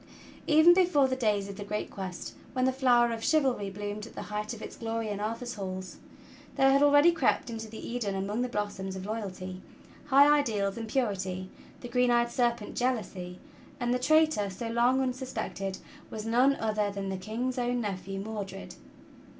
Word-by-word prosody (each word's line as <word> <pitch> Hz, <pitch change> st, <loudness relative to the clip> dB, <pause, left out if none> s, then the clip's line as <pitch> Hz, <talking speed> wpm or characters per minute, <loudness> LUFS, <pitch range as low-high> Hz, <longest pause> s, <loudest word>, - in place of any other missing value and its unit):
'' -, -, -20 dB
VEN 315 Hz, +3 st, +7 dB
before 350 Hz, -7 st, +4 dB
the 260 Hz, -, -1 dB
days 210 Hz, -5 st, 0 dB
of 200 Hz, -1 st, -8 dB
the 205 Hz, -, -5 dB
great 210 Hz, +1 st, -4 dB
Quest, 185 Hz, -2 st, -6 dB, 0.2 s
when 255 Hz, -1 st, +1 dB
the 260 Hz, -, +3 dB
flower 245 Hz, -3 st, +3 dB
of 225 Hz, 0 st, -5 dB
chivalry 265 Hz, -10 st, +2 dB
bloomed 205 Hz, +2 st, -5 dB
at -, -, -15 dB
the -, -, -5 dB
height 210 Hz, 0 st, -2 dB
of 230 Hz, -, -6 dB
its -, -, -8 dB
glory 225 Hz, -1 st, -3 dB
in 205 Hz, -1 st, -3 dB
Arthur's 230 Hz, +3 st, -3 dB
halls, 185 Hz, -3 st, -6 dB, 0.6 s
there 270 Hz, 0 st, +5 dB
had 275 Hz, +1 st, +4 dB
already 290 Hz, +3 st, +6 dB
crept 270 Hz, -6 st, +1 dB
into 225 Hz, -1 st, -5 dB
that 220 Hz, -, -9 dB
Eden 230 Hz, -5 st, -3 dB
among 200 Hz, +4 st, -2 dB
the 250 Hz, -, -1 dB
blossoms 205 Hz, -3 st, -3 dB
of 190 Hz, 0 st, -6 dB
loyalty, 185 Hz, -4 st, -5 dB, 0.5 s
high 280 Hz, 0 st, +7 dB
ideals 205 Hz, -7 st, -1 dB
and 225 Hz, -1 st, -5 dB
purity, 190 Hz, -6 st, -2 dB, 0.3 s
the 245 Hz, -, -6 dB
green 250 Hz, +1 st, +2 dB
eyed 240 Hz, 0 st, +3 dB
serpent 235 Hz, -3 st, 0 dB
Jealousy; 205 Hz, -8 st, -2 dB, 0.4 s
and 245 Hz, 0 st, 0 dB
the 250 Hz, -, +1 dB
traitor, 310 Hz, -6 st, +3 dB
so 210 Hz, +5 st, -5 dB
long 240 Hz, +3 st, +3 dB
unsuspected, 255 Hz, -7 st, -3 dB, 0.3 s
was 215 Hz, 0 st, -6 dB
none 250 Hz, +5 st, +4 dB
other 215 Hz, -3 st, 0 dB
than 200 Hz, -1 st, -4 dB
the 190 Hz, -, -2 dB
King's 235 Hz, +6 st, -3 dB
cwn 245 Hz, 0 st, 0 dB
nephew, 195 Hz, -3 st, -4 dB
Mordred. 200 Hz, -2 st, -6 dB
225 Hz, 185 wpm, -29 LUFS, 200-250 Hz, 0.6 s, VEN